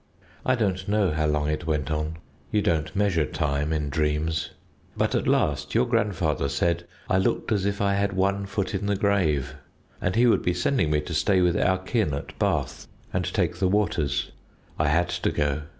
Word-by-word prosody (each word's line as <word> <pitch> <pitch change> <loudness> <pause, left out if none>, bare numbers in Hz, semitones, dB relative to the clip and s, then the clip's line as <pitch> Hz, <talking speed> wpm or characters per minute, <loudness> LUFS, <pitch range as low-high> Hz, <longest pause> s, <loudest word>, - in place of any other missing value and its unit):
I 130 - +2
don't 95 -5 -1
know 105 -3 +2
how 75 0 0
long 75 -1 0
it 75 +2 -2
went 75 -2 -1
on 75 +1 -2 0.3
you 105 - +2
don't 80 -2 0
measure 95 -5 +2
time 75 +1 -1
in 75 -2 -1
dreams 75 +2 0 0.5
but - - +1
at - - 0
last 70 +4 +1
your 120 +2 +4
grandfather 100 - 0
said 85 +5 0 0.2
I 95 - +2
looked 95 - 0
as 100 -2 +1
if 100 0 -2
I 100 -1 +2
had 100 0 0
one 100 +1 0
foot 100 -1 -2
in 100 +1 -2
the 100 - +1
grave, 95 -9 +1 0.5
and 90 - 0
he 120 +2 +5
would 120 - +4
be 90 - 0
sending 90 - +1
me 75 -1 +2
to 85 +3 -6
stay 95 +4 +2
with 90 -1 +3
our 95 -2 +2
kin 95 - -1
at 70 - -8
Bath - - -1 0.3
and 90 -1 0
take 90 -4 0
the 95 +1 +2
waters. 85 -8 0 0.5
I 75 - +2
had 85 +4 +2
to 90 0 -1
go. 75 0 0
90 Hz, 200 wpm, -25 LUFS, 75-100 Hz, 0.5 s, he